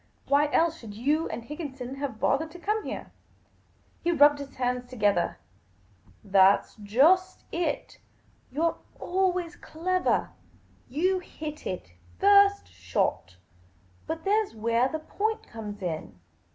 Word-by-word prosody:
" - - -39
Why 290 +1 +3
else 330 +1 +2
should 210 -3 -10
you 290 +8 +1
and 235 - -5
Higginson 265 -2 -6
have 275 -6 -4
bothered 310 +4 +1
to - - -9
come 425 +4 -1
here? - - -6 0.4
" - - -36
He 345 - +2
rubbed 290 -2 +6
his 280 -1 -8
hands 250 -1 -2
together. 205 - +1 0.3
' 95 +2 -34
' - - -29 0.2
That 190 +1 +6
's - - -23
just 275 - +3
it. 335 -4 -2 0.5
You 300 +5 -2
're 335 - +2 0.2
always 360 -2 0
clevah. 365 +3 0 0.6
You 365 +8 +1
hit 305 -4 -7
it 180 - -5 0.3
first 400 0 +5
shot. 90 0 -2 0.7
But 320 0 -4
there 420 +3 +3
's 395 - -12
wheah 230 +4 +1
the 315 - -1
point 435 +7 -2
comes 210 -3 -8
in. 155 - -4
290 Hz, 150 wpm, -27 LUFS, 230-350 Hz, 0.7 s, rubbed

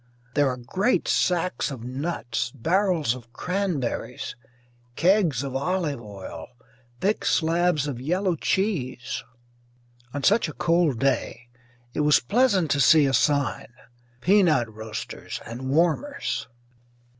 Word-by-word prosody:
There 145 -2 +3
are 125 - -3
great 185 - 0
sacks 180 -1 +1
of 130 -5 -7
nuts, 125 -3 -3
barrels 170 - +1
of 120 -2 -11
cranberries, 180 -10 -3 0.6
kegs 170 - +3
of 135 -1 -5
olive 150 -2 -1
oil, 100 -4 -9 0.5
thick 205 +3 +1
slabs 165 -2 +2
of 130 -5 -4
yellow 180 +5 0
cheese. 145 - -1 0.9
On 145 +1 -5
such 210 -4 +3
a - - -7
cold 165 -6 +2
day 125 -2 -1 0.4
it - - -3
was 150 0 +5
pleasant 195 - +2
to 140 - +2
see 155 +1 +6
a 135 - +1
sign 140 -4 +1 0.5
"Peanut 160 - +3
Roasters 110 0 -6
and 120 +4 -6
Warmers." 170 - 0
150 Hz, 120 wpm, -25 LUFS, 125-180 Hz, 0.9 s, see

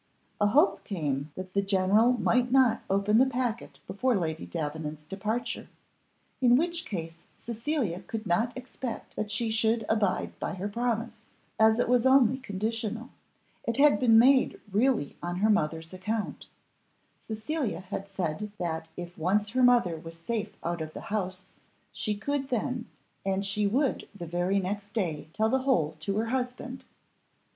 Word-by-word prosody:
A 205 - +4
hope 295 - +3
came 150 -6 -2
that 185 0 -7
the 200 - +3
general 200 +5 +4
might 245 +3 +2
not 255 -4 +4
open 200 +3 +3
the 265 - +5
packet 245 -3 -2
before 245 +3 +1
Lady 160 -3 -3
Davenant's 150 -1 -4
departure, 210 +7 -3 0.7
in 245 -1 +6
which 335 +3 0
case 165 - -6
Cecilia 230 - -2
could 225 +2 -6
not 215 +7 +1
expect 255 -1 -6
that 210 - -3
she 220 +3 0
should 225 0 +2
abide 215 -4 0
by - - -3
her 190 +2 -3
promise, 230 0 -2 0.4
as 220 0 +6
it 245 - +1
was 250 +1 +4
only 260 -1 +5
conditional. 225 +1 -3 0.6
It 235 - 0
had 290 +1 +6
been 230 -3 +6
made 260 +3 +5
really 225 - +1
on 175 0 -3
her 210 +4 +3
mother's 160 -3 0
account; 210 +4 -3 0.7
Cecilia 220 - -3
had 190 +1 -5
said 195 +1 -3
that 160 -2 -3
if 175 0 -7
once 205 +5 +1
her 255 +2 +1
mother 240 -9 +4
was 165 +1 -9
safe 210 +4 -3
out 170 0 -2
of 155 0 -5
the - - -6
house, 185 -2 -2 0.4
she 220 -2 -2
could 275 +6 -2
then, 245 0 -2 0.4
and 195 0 0
she 205 +1 +1
would 265 +6 0
the 175 - -6
very 175 +4 0
next 200 +2 -4
day 165 -9 -2
tell 220 +5 +1
the 265 - +2
whole 165 - +1
to 195 +6 -2
her 220 - +1
husband. 255 +1 -3
210 Hz, 160 wpm, -28 LUFS, 185-245 Hz, 0.7 s, in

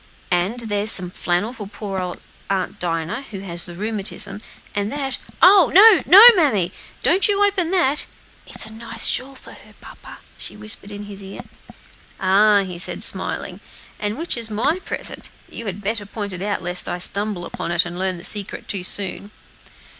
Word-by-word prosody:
And 180 +7 0
here's 210 -2 0
some 180 -4 +4
flannel 180 +7 -1
for 210 -5 -8
poor 200 -2 -6
old 180 -1 -5 0.3
Aunt 190 -2 -2
Dinah, 170 +6 -2
who 195 -3 -7
has 175 -3 -2
the 175 - -10
rheumatism; 205 0 -3 0.3
and 205 +1 -2
that 275 -2 -3 0.2
oh! 370 0 +7
no, 425 +1 +8
no, 395 +5 +9
mammy! 215 - +1 0.3
don't 380 - +4
you 410 0 +2
open 380 -5 0
that! 340 -6 +1 0.4
It's - - +1
a 220 - -6
nice 230 +1 -2
shawl 265 +2 +2
for - - -14
her, - - -17
papa," - - -13 0.2
she - - -5
whispered 210 -1 0
in 205 0 -8
his 205 -1 -9
ear. 195 0 -9 0.8
"Ah!" 200 +1 +4
he 180 -2 -7
said, - - -1
smiling; - - -1 0.4
"and 210 +1 -3
which 330 +3 -3
is 230 -1 -4
my 275 - 0
present? - - -5 0.2
You 230 - -5
had 200 +1 -6
better 205 0 -3
point 205 -2 -6
it 180 - -6
out, 200 -1 -2
lest 175 +1 -1
I - - -3
should 175 - -1
stumble 200 -3 -4
upon - - -6
it 170 0 +1
and 175 0 -7
learn 185 -1 -2
the 170 - -10
secret 205 -1 +1
too 195 -3 -3
soon." 200 +2 -1
205 Hz, 185 wpm, -20 LUFS, 185-235 Hz, 0.8 s, no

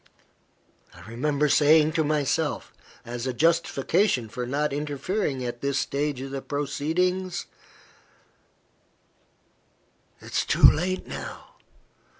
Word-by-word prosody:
I - - -14
remember 140 +6 -1
saying 150 +2 +5
to 160 - +2
myself, 150 +1 -1 0.3
as 120 +1 -5
a 130 - -1
justification 165 - +1
for 125 +2 -5
not 145 +2 -1
interfering 145 0 -2
at 120 0 -5
this 140 0 0
stage 140 -2 -1
of 135 0 -6
the 135 0 -4
proceedings 175 +6 -1 2.7
"It - - -12
is - - +1
too - - -1
late 185 +4 +1
now. - - -8
145 Hz, 110 wpm, -26 LUFS, 135-160 Hz, 2.7 s, saying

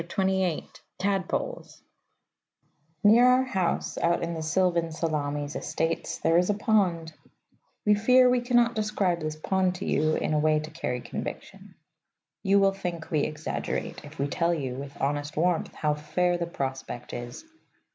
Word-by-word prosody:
TADPOLES 195 -1 -2 1.2
Near 220 +4 +7
our 250 +1 +5
house, 190 -9 -1
out 170 0 +1
in 170 0 -2
the 160 - -4
sylvan 170 +1 +1
Salamis 145 -2 -2
Estates, 165 0 -2
there 165 +1 +3
is 180 - +1
a 205 - +2
pond. 185 -7 +1 0.7
We 210 - +5
fear 250 +5 +5
we 250 0 +3
cannot 240 -1 +3
describe 210 -5 0
this 155 -1 -3
pond 185 +3 0
to 185 - -5
you 155 +1 +2
in - - -1
a 150 - +2
way 155 0 +3
to 155 +1 -7
carry 125 -6 -3
conviction. - - -7 0.7
You 195 +1 +3
will 195 -1 +4
think 175 -4 -5
we 155 - +2
exaggerate 155 +2 -3
if - - -12
we 140 - 0
tell 170 +4 +1
you, 135 -5 -3
with 140 +2 -8
honest 145 +2 -2
warmth, 170 0 +1
how 150 -1 +1
fair 155 +4 0
the 170 -1 -2
prospect 135 -5 -5
is. 120 - -7
170 Hz, 155 wpm, -27 LUFS, 155-195 Hz, 1.2 s, Near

